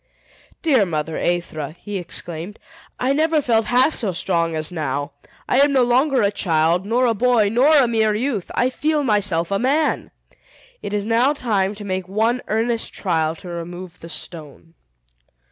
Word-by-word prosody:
"Dear 275 Hz, -10 st, +4 dB
mother 160 Hz, -3 st, -3 dB
Aethra," 155 Hz, -4 st, -2 dB
he 205 Hz, -2 st, -5 dB
exclaimed, 175 Hz, +2 st, -6 dB, 0.4 s
"I 260 Hz, +2 st, +1 dB
never 315 Hz, +2 st, +2 dB
felt 230 Hz, -5 st, +1 dB
half 255 Hz, +5 st, +3 dB
so 205 Hz, -6 st, -1 dB
strong 170 Hz, -2 st, 0 dB
as 155 Hz, +2 st, -2 dB
now! 145 Hz, -3 st, -3 dB, 0.4 s
I 255 Hz, -, +2 dB
am 285 Hz, +1 st, +5 dB
no 265 Hz, -2 st, +4 dB
longer 255 Hz, +1 st, +2 dB
a 200 Hz, -, +2 dB
child, 170 Hz, 0 st, +1 dB
nor 245 Hz, +3 st, +2 dB
a 235 Hz, -, +3 dB
boy, 230 Hz, -2 st, +2 dB
nor 270 Hz, +8 st, +4 dB
a 265 Hz, -4 st, +5 dB
mere 220 Hz, -2 st, +1 dB
youth! 225 Hz, -4 st, -2 dB
I 250 Hz, +2 st, +2 dB
feel 300 Hz, +2 st, 0 dB
myself 200 Hz, -7 st, +1 dB
a 195 Hz, -, +1 dB
man! 290 Hz, +5 st, +1 dB, 0.7 s
It 205 Hz, -, -4 dB
is 205 Hz, -1 st, -2 dB
now 235 Hz, +5 st, +3 dB
time 210 Hz, -7 st, -1 dB
to 205 Hz, -, -9 dB
make 185 Hz, -2 st, -3 dB
one 225 Hz, +5 st, 0 dB
earnest 225 Hz, +2 st, 0 dB
trial 160 Hz, -4 st, 0 dB
to 180 Hz, -, -12 dB
remove 175 Hz, +1 st, -7 dB
the 165 Hz, -, -10 dB
stone." 165 Hz, -1 st, -7 dB
210 Hz, 170 wpm, -21 LUFS, 170-250 Hz, 0.7 s, am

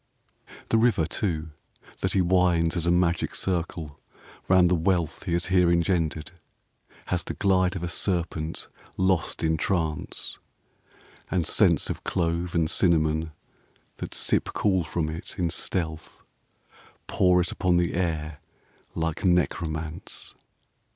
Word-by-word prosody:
V -, -, -17 dB, 0.2 s
The 115 Hz, -, +3 dB
river, 110 Hz, -9 st, +3 dB
too, 80 Hz, -4 st, -2 dB, 0.5 s
that -, -, 0 dB
he 95 Hz, -, +3 dB
winds 90 Hz, -2 st, +2 dB
as 85 Hz, -1 st, 0 dB
a -, -, +4 dB
magic 85 Hz, -1 st, +1 dB
circle 85 Hz, -5 st, -3 dB, 0.5 s
round 90 Hz, -1 st, +5 dB
the 90 Hz, -, +2 dB
wealth 85 Hz, -1 st, 0 dB
He 85 Hz, -, -1 dB
has 85 Hz, +1 st, +1 dB
here 90 Hz, -2 st, +5 dB
engendered, 85 Hz, -1 st, 0 dB, 0.8 s
has 90 Hz, -1 st, 0 dB
the -, -, -5 dB
glide 95 Hz, -2 st, +2 dB
of 90 Hz, -, -4 dB
a -, -, -1 dB
serpent 85 Hz, -3 st, -1 dB, 0.3 s
lost 95 Hz, -4 st, 0 dB
in 80 Hz, 0 st, +2 dB
trance; 80 Hz, -2 st, -2 dB, 0.9 s
And 90 Hz, -3 st, 0 dB
scents -, -, +3 dB
of -, -, -7 dB
clove 85 Hz, 0 st, -1 dB
and 80 Hz, -2 st, +2 dB
cinnamon 80 Hz, -2 st, +2 dB, 0.7 s
that -, -, -5 dB
sip -, -, +2 dB
cool 95 Hz, -4 st, +2 dB
from 85 Hz, -1 st, -2 dB
it, 80 Hz, +5 st, -5 dB
in 85 Hz, -3 st, 0 dB
stealth 80 Hz, -3 st, -2 dB, 0.8 s
Pour 90 Hz, -1 st, +3 dB
it 90 Hz, 0 st, 0 dB
upon 90 Hz, -2 st, +1 dB
the 85 Hz, -1 st, +1 dB
air 80 Hz, -4 st, -2 dB, 0.6 s
like 80 Hz, +2 st, -2 dB
necromance. 80 Hz, -2 st, -1 dB
85 Hz, 135 wpm, -26 LUFS, 80-90 Hz, 0.9 s, round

